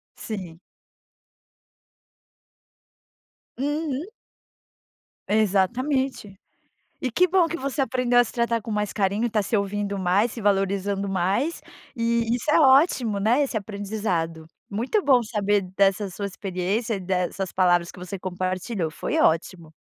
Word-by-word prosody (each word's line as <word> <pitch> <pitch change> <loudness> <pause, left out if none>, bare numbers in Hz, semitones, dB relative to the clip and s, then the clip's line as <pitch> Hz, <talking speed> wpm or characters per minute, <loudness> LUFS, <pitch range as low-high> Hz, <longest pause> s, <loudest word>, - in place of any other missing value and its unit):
Sim. 180 -6 -7 3.0
Uhum. 295 +4 -2 1.2
Exatamente, 220 +3 +1 0.7
e 255 -4 -2
que 365 +5 +3
bom 360 -1 +4
que 335 +1 -4
você 275 0 -3
aprendeu 250 -2 +2
a 245 - +6
se - - -8
tratar 235 -1 0
com 220 +1 -6
mais 210 -1 -1
carinho, 200 +1 0
e - - +2
está 215 -1 +1
se 210 +3 0
ouvindo 200 0 -2
mais, 195 +5 +2
se 230 - -7
valorizando 200 0 0
mais, 195 - 0 0.3
e 230 -1 0
isso 250 +5 -1
é - - +5
ótimo, 265 - +4
né, 230 +7 +3
esse 255 -4 -4
aprendizado. 200 -6 -3 0.2
Muito 235 - 0
bom 260 -4 +5
saber 205 -2 +1 0.2
dessa 195 0 +2
sua 200 +3 -4
experiência 195 +4 -2
e 195 - -4
dessas 185 0 -2
palavras 175 -2 +2
que - - -14
você 185 +2 -6
compartilhou, 185 0 -3
foi - - -3
ótimo. 165 0 0
205 Hz, 135 wpm, -24 LUFS, 190-245 Hz, 3.0 s, a